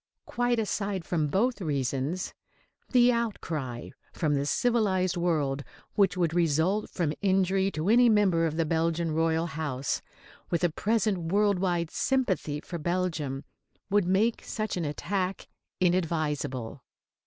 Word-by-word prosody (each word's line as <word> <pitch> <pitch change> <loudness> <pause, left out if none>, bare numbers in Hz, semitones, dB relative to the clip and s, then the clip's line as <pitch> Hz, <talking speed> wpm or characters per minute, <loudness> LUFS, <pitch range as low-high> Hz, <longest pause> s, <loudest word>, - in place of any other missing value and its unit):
Quite 245 0 0
aside 200 -4 -2
from 160 -4 0
both 220 - +1
reasons, 140 +2 -2 0.6
the 245 -1 +6
outcry 160 - -3 0.2
from 155 -4 0
the 140 0 0
civilised 195 -5 +1
world 150 -6 0 0.3
which 195 -3 +2
would 170 -3 +1
result 175 +5 +1
from 160 -5 -1
injury 190 0 +2
to 155 -2 -3
any 240 +3 +6
member 190 -6 +3
of 155 0 -4
the 165 - +2
Belgian 165 +1 0
royal 160 +1 +1
house, 145 -5 -2 0.5
with 170 - 0
the 175 -2 +2
present 215 +1 +1
world 200 -1 +3
wide 175 -3 0
sympathy 190 - 0
for 170 - -6
Belgium, 160 -5 -2 0.5
would 205 -2 +3
make 210 +5 +2
such 215 -1 -3
an 175 -3 -2
attack 185 +6 -2 0.3
inadvisable. 155 -9 -1
175 Hz, 130 wpm, -28 LUFS, 155-200 Hz, 0.6 s, the